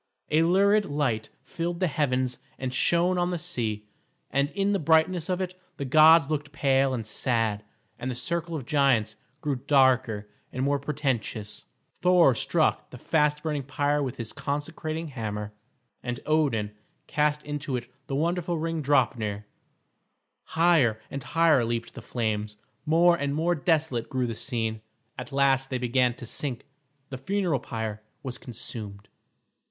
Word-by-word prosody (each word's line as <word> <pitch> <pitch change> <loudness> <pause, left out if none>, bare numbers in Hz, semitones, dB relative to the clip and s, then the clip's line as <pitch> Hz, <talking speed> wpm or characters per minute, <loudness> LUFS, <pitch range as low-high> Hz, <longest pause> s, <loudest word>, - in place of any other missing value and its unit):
A 155 +1 +4
lurid 200 +5 +4
light 135 - -1
filled 170 0 -4
the 185 - +2
heavens 130 -6 0 0.2
and 130 -1 -4
shone 175 +6 +2
on 175 0 +1
the 180 - -1
sea, 110 -8 -2 0.5
and 140 +1 +1
in 200 +3 0
the 200 - +1
brightness 160 +2 +2
of 185 0 0
it 185 -1 -3 0.2
the 140 - -3
gods 155 +2 +7
looked 145 -1 -3
pale 135 -2 +2
and 115 -3 -4
sad, 110 -1 +1 0.4
and 130 - -3
the 125 - -3
circle 170 +6 -2
of 140 -6 -5
giants 130 -7 +2 0.3
grew 145 -3 -1
darker 130 -6 +2 0.2
and 130 - -3
more 140 0 +1
portentous. 135 -7 -3 0.3
Thor 180 -6 +4
struck - - +1
the - - -10
fast 150 -1 +1
burning 150 -3 -1
pyre 145 +2 0
with 130 -4 -3
his 115 -2 -4
consecrating 155 +2 -4
hammer, 105 -5 -5 0.5
and 125 -1 -4
Odin 135 -10 +1 0.3
cast 150 0 0
into 145 -2 -3
it 120 -1 -3 0.2
the 135 - -2
wonderful 170 +3 0
ring 165 0 -2
Draupner. 115 -7 +1 1.0
Higher 160 -10 +3
and 140 - -4
higher 160 -2 +3
leaped 115 0 -3
the - - -9
flames, 105 -3 -2 0.3
more 170 +2 +5
and 140 -3 -2
more 165 +3 +2
desolate 155 -6 0
grew 130 -1 0
the 115 - -3
scene; 110 -2 -2 0.4
at - - -7
last 135 -1 +2
they 130 - -1
began 125 0 +1
to 120 - -9
sink, 125 +1 -2 0.5
the 130 - -5
funeral 180 -1 0
pyre 110 -2 -5 0.2
was 130 -2 -6
consumed. 110 -4 -7
140 Hz, 155 wpm, -27 LUFS, 120-160 Hz, 1.0 s, gods